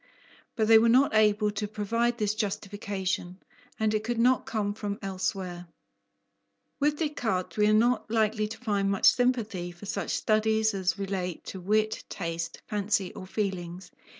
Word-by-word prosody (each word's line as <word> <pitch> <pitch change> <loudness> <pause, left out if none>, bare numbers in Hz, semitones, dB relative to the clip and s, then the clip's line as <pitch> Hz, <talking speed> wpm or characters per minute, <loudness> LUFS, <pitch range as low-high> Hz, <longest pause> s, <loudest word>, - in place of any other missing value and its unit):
But 220 -1 +1
they 225 0 +8
were 230 +1 +4
not 260 +3 +4
able 210 -1 +3
to 210 0 -3
provide 230 +3 -1
this 210 -2 0
justification, 195 -3 -3 0.4
and 220 -1 +1
it 215 0 0
could 240 +1 -2
not 250 +2 +3
come 205 -2 -1
from 205 -1 -4
elsewhere. 185 -2 -3 1.1
With 295 +1 +2
Descartes, 240 - -2
we 210 0 +3
are - - +4
not 235 +2 +2
likely 215 -1 +1
to 215 - -8
find 205 -5 0
much 195 -1 +1
sympathy 225 -8 0
for 175 +4 -12
such 200 0 -3
studies 220 0 +2
as 190 -1 0
relate 190 -3 -4
to 190 - -7
wit, 215 +3 +1
taste, 165 -2 -4
fancy, 205 -3 -1
or 185 - -9
feelings. 185 -3 -4
210 Hz, 155 wpm, -28 LUFS, 190-220 Hz, 1.1 s, they